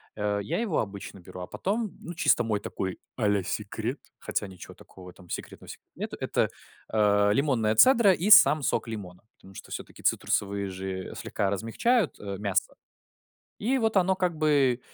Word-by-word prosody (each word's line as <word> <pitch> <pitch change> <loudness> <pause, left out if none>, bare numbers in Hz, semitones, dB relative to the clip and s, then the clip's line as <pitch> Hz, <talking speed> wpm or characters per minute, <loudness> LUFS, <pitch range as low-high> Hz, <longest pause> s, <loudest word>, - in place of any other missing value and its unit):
Э, 105 -1 -1
я 100 - -2
его 220 -8 0
обычно 100 -2 -6
беру, 90 +1 -11
а 90 - -6
потом, 210 0 -3
ну, 175 - -7
чисто 160 -7 +3
мой 110 -3 -1
такой 95 -2 -5 0.2
а-ля 100 -4 +1
секрет, 110 +7 -4 0.2
хотя - - -3
ничего 95 -2 -11
такого 95 - -15
в - - -8
этом 90 0 -16
секретного, - - -7
сек - - -10
нету, - - -5
это, - - 0 0.4
а, 105 -1 +3
лимонная 115 -3 +1
цедра 235 - +6
и 185 +3 -1
сам 155 -7 +8
сок - - 0
лимона. 95 -5 -8
Потому 95 0 -17
что - - -11
всё-таки - - -8
цитрусовые 100 -1 0
же 95 0 -5
слегка 100 - -2
размягчают, 125 - 0
э, 100 -1 -5
мясо. 100 -2 -1 0.8
И 245 +6 +1
вот 225 -3 0
оно 190 0 +3
как 180 -3 -1
бы 140 -5 +2
110 Hz, 175 wpm, -27 LUFS, -, 0.8 s, сам